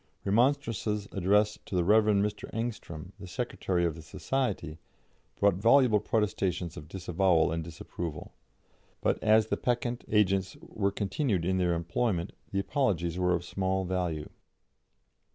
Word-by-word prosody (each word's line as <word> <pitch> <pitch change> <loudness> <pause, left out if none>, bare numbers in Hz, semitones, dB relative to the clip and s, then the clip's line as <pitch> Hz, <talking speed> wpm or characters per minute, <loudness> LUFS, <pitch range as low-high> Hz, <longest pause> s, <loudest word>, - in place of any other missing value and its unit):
Remonstrances 115 -2 +1
addressed 105 +3 +2
to - - -4
the 90 - +3
Rev. 105 +4 +5
Mr. 105 0 0
Engström, 105 -7 -5
the 95 - -8
secretary 90 -4 -1
of 85 - 0
the 80 - -10
society, 90 - -3 0.6
brought 100 -1 +5
voluble 115 +3 +5
protestations 95 -5 -1
of 75 - -9
disavowal 90 -1 +2
and 80 0 -2
disapproval; 80 -1 -7 0.7
but - - +1
as 110 0 +5
the - - 0
peccant 120 0 -1
agents 95 -3 +1
were 100 -2 -2
continued 100 - -1
in 95 +1 +1
their 90 -1 +2
employment, 85 +2 -1 0.2
the 95 - -2
apologies 90 - 0
were 90 0 +3
of 90 0 -4
small 95 +1 -1
value. 90 -4 -2
95 Hz, 135 wpm, -29 LUFS, 85-105 Hz, 0.7 s, Rev